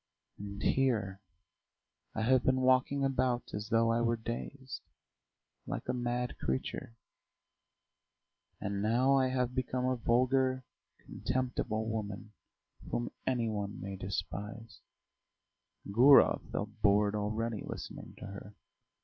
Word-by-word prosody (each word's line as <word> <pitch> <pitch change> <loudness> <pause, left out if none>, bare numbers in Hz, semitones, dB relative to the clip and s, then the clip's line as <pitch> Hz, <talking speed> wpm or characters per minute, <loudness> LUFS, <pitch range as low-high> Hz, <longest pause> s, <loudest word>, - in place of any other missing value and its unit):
And 100 0 -6
here 110 -8 +1 0.9
I 110 - 0
have 130 +2 +4
been 130 0 +3
walking 130 +2 +3
about 130 -2 0
as 105 +1 -4
though 115 0 +3
I 115 +1 +2
were 115 0 +2
dazed, 130 +4 -6 0.9
like - - -4
a - - 0
mad 125 0 -2
creature;... 65 +11 -3 1.6
and 100 0 -2
now 120 +6 +3
I 130 -1 +4
have 125 -1 0
become 125 0 -1
a 130 0 +2
vulgar, 130 +2 +2 0.4
contemptible 120 -4 -2
woman 105 -1 -4 0.6
whom - - -2 0.2
any 125 -3 +1
one 105 -2 -3
may 95 0 -5
despise." 100 +4 -5 1.1
Gurov 125 +8 +6
felt 105 +1 -4
bored 105 0 +4
already, 110 +1 -1
listening - - -7
to - - -8
her. 100 +1 -9
115 Hz, 115 wpm, -32 LUFS, 105-130 Hz, 1.6 s, Gurov